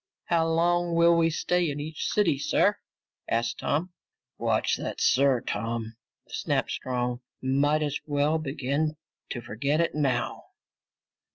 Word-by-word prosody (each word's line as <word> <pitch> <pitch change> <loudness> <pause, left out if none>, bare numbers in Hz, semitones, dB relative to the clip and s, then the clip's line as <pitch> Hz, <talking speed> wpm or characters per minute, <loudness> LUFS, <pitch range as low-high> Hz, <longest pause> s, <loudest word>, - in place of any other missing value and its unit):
"How 165 -1 +3
long 170 +1 +2
will 170 0 +6
we 165 -1 +3
stay 175 +1 +1
in 145 0 -4
each 155 +1 -4
city, 180 -10 +2
sir?" - - +2 0.5
asked 115 +1 0
Tom. 170 +5 -1 0.5
"Watch - - +1
that - - -5
'sir,' 135 -2 +4
Tom," 115 +1 -3 0.3
snapped - - -1
Strong. 125 -1 -2 0.2
"Might 145 +4 +2
as 145 -1 -2
well 145 +2 +1
begin 145 +1 -1 0.3
to 120 - -4
forget 140 +6 -1
it 170 - +1
now." 135 -5 -1
145 Hz, 130 wpm, -27 LUFS, 125-165 Hz, 0.5 s, will